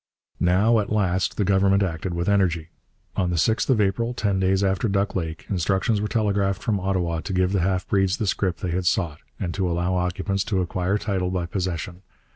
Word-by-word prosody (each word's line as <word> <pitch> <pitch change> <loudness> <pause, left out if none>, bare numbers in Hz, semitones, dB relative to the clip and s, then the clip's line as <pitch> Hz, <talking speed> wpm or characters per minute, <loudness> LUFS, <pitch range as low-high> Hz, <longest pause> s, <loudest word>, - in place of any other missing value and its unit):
Now 100 +6 +3
at 105 - -3
last 95 -3 +1
the 105 - +2
Government 100 +1 +3
acted 85 0 -3
with 85 0 -2
energy. 90 -5 +1 0.5
On 90 -2 0
the 90 - -1
6th 110 - +1
of 130 -4 +4
April, 110 +4 0
ten 100 -5 0
days 95 +1 +2
after 95 +3 +1
Duck 100 +1 0
Lake, 80 -2 -4
instructions 95 +3 0
were 105 - -1
telegraphed 100 -3 0
from 105 -3 0
Ottawa 90 -3 -1
to 100 - -6
give 90 0 +2
the 100 -2 +1
half 95 +1 0
breeds 95 -2 +2
the 110 - -1
scrip 95 -2 0
they 90 - -2
had 90 +1 -1
sought, 80 -5 0 0.2
and 85 -2 -2
to 95 -2 -1
allow 85 +2 0
occupants 90 +2 -1
to 100 -4 0
acquire 90 +2 0
title 95 -3 -1
by 90 -2 -1
possession. 90 0 -4
95 Hz, 205 wpm, -24 LUFS, 90-100 Hz, 0.5 s, of